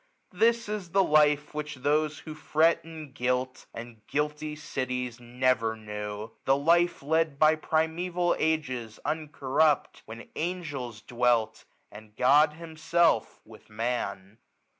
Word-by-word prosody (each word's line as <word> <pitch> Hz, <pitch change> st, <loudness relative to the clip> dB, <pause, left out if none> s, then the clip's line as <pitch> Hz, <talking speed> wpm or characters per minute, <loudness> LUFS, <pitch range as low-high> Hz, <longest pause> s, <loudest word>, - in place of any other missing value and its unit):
1345 230 Hz, -2 st, +1 dB
This 205 Hz, -3 st, -6 dB
is -, -, -23 dB
the 195 Hz, -, +5 dB
life 150 Hz, -2 st, +3 dB
which 150 Hz, 0 st, -4 dB
those 150 Hz, +3 st, 0 dB
who 155 Hz, -, -8 dB
fret 155 Hz, +2 st, +2 dB
in 160 Hz, -3 st, -10 dB
guilt. 130 Hz, -1 st, -2 dB
And 115 Hz, -1 st, -10 dB
guilty 150 Hz, +1 st, -2 dB
cities, 125 Hz, -4 st, -4 dB
never 120 Hz, -2 st, 0 dB
knew; 105 Hz, 0 st, -6 dB
the 135 Hz, +1 st, +3 dB
life. 170 Hz, +2 st, +2 dB
Led 160 Hz, 0 st, +1 dB
by 155 Hz, +1 st, +5 dB
primeval 170 Hz, +3 st, 0 dB
ages, 130 Hz, -8 st, -1 dB
uncorrupt. 150 Hz, -1 st, 0 dB
When 115 Hz, +1 st, -9 dB
angels 145 Hz, -10 st, -4 dB
dwelt, 120 Hz, -2 st, 0 dB, 0.3 s
and 105 Hz, 0 st, -13 dB
God 145 Hz, +5 st, +5 dB
himself, 165 Hz, -4 st, 0 dB
with 110 Hz, 0 st, -16 dB
Man. 110 Hz, -2 st, -4 dB
145 Hz, 125 wpm, -28 LUFS, 120-160 Hz, 0.3 s, the